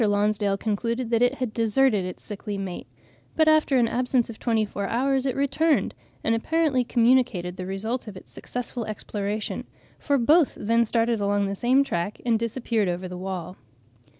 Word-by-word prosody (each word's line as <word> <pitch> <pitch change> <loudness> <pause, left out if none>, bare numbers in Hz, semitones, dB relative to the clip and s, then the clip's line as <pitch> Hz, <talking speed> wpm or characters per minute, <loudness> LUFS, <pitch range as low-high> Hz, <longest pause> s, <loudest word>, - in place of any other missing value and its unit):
Lonsdale 205 -1 +1
concluded 230 +3 -2
that 230 0 +2
it 245 +2 +3
had 250 -5 -3
deserted 225 -2 +2
its 180 - -6
sickly 210 0 -5
mate; 190 -2 -5 0.5
but 315 -1 +3
after 310 -3 +4
an 240 -2 +3
absence 245 0 0
of 220 - -13
twenty 225 -3 +1
four 200 -1 -4
hours 265 +2 +1
it 260 - -1
returned, 290 +3 +1 0.3
and 225 - +2
apparently 285 +2 +1
communicated 235 -7 +2
the 185 -1 -6
result 220 +6 -3
of 200 -3 -8
its - - -14
successful 245 -1 -5
exploration, 210 0 -4 0.4
for 285 -1 +1
both 300 +5 +3
then 230 +2 +2
started 230 -1 +1
along 200 0 +1
the 195 - -2
same 250 +7 +3
track 185 -5 -3
and 230 -2 +2
disappeared 230 -3 -1
over 180 +1 -3
the 180 - -7
wall. 185 -1 -5
230 Hz, 175 wpm, -25 LUFS, 205-255 Hz, 0.5 s, after